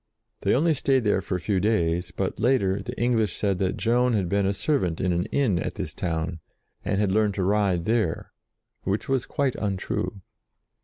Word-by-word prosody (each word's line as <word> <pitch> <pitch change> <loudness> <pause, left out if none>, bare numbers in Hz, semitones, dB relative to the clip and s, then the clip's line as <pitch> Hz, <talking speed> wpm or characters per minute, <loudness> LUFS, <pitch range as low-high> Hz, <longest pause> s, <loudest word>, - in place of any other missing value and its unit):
They - - +2
only 160 +5 +3
stayed 135 -2 +2
there 105 -2 +2
for 90 - -3
a - - -1
few 95 +1 0
days, 90 -4 +1
but, 95 0 -3
later, 100 -6 +2
the 120 +5 -7
English 115 -5 +1
said 100 -3 0
that 95 -1 0
Joan 120 +2 +2
had 95 -5 0
been 100 0 +2
a - - +2
servant 95 - 0
in 90 -2 +1
an 85 +1 0
inn 120 -11 +1
at - - -3
this - - -5
town, 80 0 -2 0.4
and 100 -1 0
had 105 -2 +2
learned 105 -1 +2
to 95 - -1
ride 95 -3 +1
there, 110 -7 0 0.5
which 100 +3 -2
was 135 -2 0
quite 140 -3 0
untrue. 100 0 -3
100 Hz, 195 wpm, -25 LUFS, 90-120 Hz, 0.5 s, only